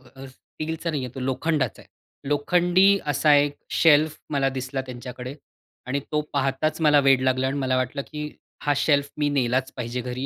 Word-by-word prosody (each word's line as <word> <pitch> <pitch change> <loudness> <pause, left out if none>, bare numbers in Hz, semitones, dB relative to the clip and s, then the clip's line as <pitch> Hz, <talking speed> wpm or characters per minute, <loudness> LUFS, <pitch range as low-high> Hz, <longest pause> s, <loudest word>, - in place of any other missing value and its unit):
अ, 135 0 -9
स्टीलचा 160 +5 -6
नाहीये 135 -5 -3
तो - - -5
लोखंडाचा 135 +4 -1
आहे. - - -21 0.4
लोखंडी 180 +6 +3
असा 145 +1 +3
एक 145 0 +3 0.2
शेल्फ 155 -1 +4
मला 140 -2 +1
दिसला 130 +1 -3
त्यांच्याकडे 125 +1 -8 0.5
आणि 140 +2 -1
तो 150 0 +1
पाहताच 140 +4 0
मला 150 -2 +5
वेड 135 -2 +4
लागला 130 0 +1
आणि 140 +2 -2
मला 130 -1 0
वाटलं, 130 +3 -2
की 150 -1 -6 0.3
हा 145 0 +1
शेल्फ 145 -1 +2
मी 145 -1 +1
नेलाच 130 -1 0
पाहिजे 125 0 -4
घरी. 125 +2 -4
140 Hz, 170 wpm, -24 LUFS, 130-150 Hz, 0.5 s, मला